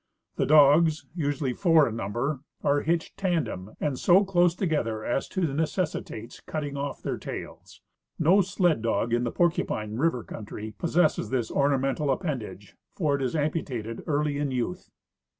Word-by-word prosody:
The - - +1
dogs, 155 +2 +5
usually 145 -5 -1
four 165 -2 +4
in 115 - -4
number, 120 +7 -2 0.2
are 145 0 +2
hitched 165 +1 -1
tandem 145 - -2
and 145 -4 -1
so 190 +3 +5
close 175 -2 +3
together 135 - -1
as 130 - -1
to 170 -8 -1
necessitates 155 - -3
cut 155 - -4
ting 145 -1 -5
off 140 0 -4
their - - -3
tails. - - -8 0.4
No 175 +5 +5
sled 180 - +1
dog 115 0 0
in 120 +1 +2
the 120 - -1
PorcujDine 115 -10 0
river 135 -6 +1
country 110 0 -7
possesses 170 -1 +1
this 125 -4 -1
ornamental 140 +1 +1
appendage, 125 - -3 0.2
for 150 -6 +1
it 140 - -3
is 130 +3 -1
amputated 135 -7 -2
early 145 -1 0
in 145 -1 0
youth. 120 -8 -3
145 Hz, 155 wpm, -27 LUFS, 120-165 Hz, 0.4 s, dogs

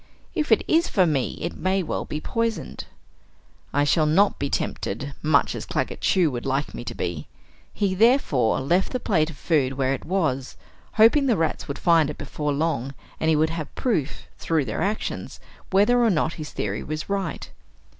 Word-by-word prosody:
If 305 -7 -1
it 220 - +5
is 330 +2 +3
for 185 -3 +3
me, 145 -6 -1
it 170 - -3
may 190 0 0
well - - -3
be 150 - -4
poisoned. 225 - -3 0.9
I 145 - +2
shall 155 +1 +3
not 195 +7 +3
be 140 - -1
tempted, 140 +5 -3
much 155 -2 +3
as - - -5
Claggett - - -3
Chew 175 -5 +3
would 120 -1 -4
like 135 +2 -1
me - - -6
to - - -5
be! 85 -4 -4 0.4
He 200 -2 0
therefore 185 - +3
left 175 - +1
the 255 - 0
plate 165 -9 +1
of 155 - -10
food 140 -6 +1
where 135 0 0
it - - -5
was, 155 -8 -1 0.4
hoping 235 +6 +5
the 235 -6 +3
rats 160 -1 -1
would 140 -1 -4
find 165 -4 +3
it 150 - -6
before 150 -1 -3
long 140 -3 -1 0.2
and 160 - +1
he 160 - +4
would 155 +1 +2
have 160 -3 -6
proof, 205 - -1 0.2
through 160 -4 0
their 110 - -3
actions, 210 +2 -3 0.3
whether 210 +6 +4
or 230 - +4
not 165 -3 +1
his 155 -2 -7
theory 105 +1 -3
was 155 0 -5
right. 195 -4 -3
160 Hz, 190 wpm, -24 LUFS, 140-195 Hz, 0.9 s, it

